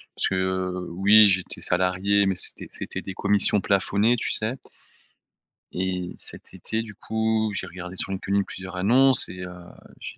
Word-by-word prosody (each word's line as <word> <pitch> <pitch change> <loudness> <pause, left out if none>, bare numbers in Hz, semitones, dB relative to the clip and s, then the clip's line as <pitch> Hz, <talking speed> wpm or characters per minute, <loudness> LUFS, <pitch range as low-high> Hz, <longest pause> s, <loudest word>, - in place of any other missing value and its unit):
parce - - 0
que, 95 - -1
heu, 95 -1 -2
oui 100 +4 +6
j'étais 95 -2 -1
salarié, 95 +3 +1
mais 95 - -1
c'était - - +3
c'était - - -6
des 95 - -7
commissions 105 +1 +1
plafonnées, 100 +4 +1
tu 120 - -3
sais? 110 +3 +2 1.2
Et 90 -1 -3
cet - - -9
été, 110 0 -3
du 105 -3 -10
coup, 110 0 -1
j'ai 95 - -4
regardé 90 +1 -9
sur 95 - -3
LinkedIn 100 +1 -1
plusieurs 95 -1 -9
annonces 125 +7 +4
et 90 - -9
heu, 90 - -7 0.5
j'ai - - -8
95 Hz, 165 wpm, -24 LUFS, 90-110 Hz, 1.2 s, oui